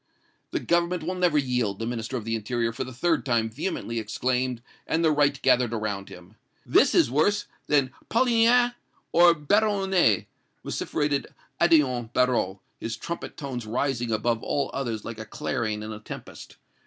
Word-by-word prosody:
"'The - - -2
Government 170 0 +1
will 180 +4 -2
never 180 -4 +2
yield!' 125 -7 0
the 115 - -4
Minister 115 +1 -3
of 110 - -6
the 115 0 -1
Interior 115 +1 -1
for 125 - -3
the 130 - -8
third 160 +6 0
time 115 -4 +1
vehemently 115 -3 -3
exclaimed, 125 +2 -1 0.2
and 165 +1 +1
the 160 - +4
right 145 -1 +2
gathered 120 -2 +3
around 100 -3 -3
him. 90 +3 -13 0.3
'This - - +4
is - - +4
worse 160 +9 +2 0.2
than 140 -3 +2 0.2
Polignac 240 0 +4 0.4
or 170 0 +6
Peyronet!' 190 - +2 0.4
vociferated 145 -2 -1 0.3
Odillon 130 -9 +3
Barrot, 120 -7 +1 0.2
his 115 0 -4
trumpet 170 +8 -6
tones 130 -7 -5
rising 120 0 -1
above 115 +1 0
all 140 -2 -1
others 115 -6 -3
like 115 -1 -6
a - - -4
clarion 110 -4 -3
in 110 0 -5
a 105 - -8
tempest. 105 - -10
125 Hz, 160 wpm, -26 LUFS, 115-160 Hz, 0.4 s, or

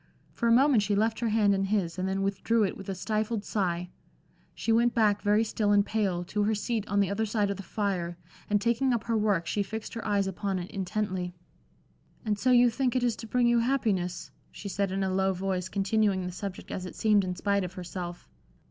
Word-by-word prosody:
For 235 - -1
a - - +4
moment 260 -1 +5
she 205 0 0
left 220 +2 +1
her 235 -1 0
hand 210 -2 +3
in 195 0 +1
his 190 -4 -1
and 185 +1 -1
then 195 0 -1
withdrew 200 +3 +1
it 190 - -3
with 195 - -9
a 195 - -2
stifled 215 +2 -2
sigh. 180 -3 -1 0.6
She 230 - -1
went 235 +1 +3
back 210 -3 +3
very 210 +1 +3
still 215 -1 0
and 200 -1 +4
pale, 195 -6 0
to 205 +4 -2
her 215 +1 +2
seat 215 0 -2
on 200 0 +2
the 200 -1 0
other 220 +2 -1
side 205 -1 0
of 200 - -4
the - - -6
fire, 180 -3 -2 0.3
and 205 0 +3
taking 235 +4 +1
up 230 -2 -1
her 230 -1 -1
work, 205 -5 +1
she 205 - -1
fixed 220 +2 -5
her 230 - -5
eyes 205 -2 +1
upon 195 0 -2
it 180 0 -6
intently. 185 -2 -3 0.9
"And 210 -2 0
so 255 - +1
you 245 -1 +6
think 255 +1 0
it 255 - +1
is 240 -3 +1
to 225 - -8
bring 245 +2 +2
you 240 0 +4
happiness?" 215 -8 -1 0.2
she 200 - -8
said, 200 -1 -1
in 195 +1 -1
a 190 -1 -1
low 190 0 +2
voice, 185 0 -2
continuing 195 -1 +1
the 180 - -4
subject 190 +1 -7
as 185 -1 -4
it - - -10
seemed 210 -2 +3
in 180 -1 -3
spite 200 +1 0
of 180 0 -5
herself. 175 -1 -7
205 Hz, 230 wpm, -28 LUFS, 190-220 Hz, 0.9 s, you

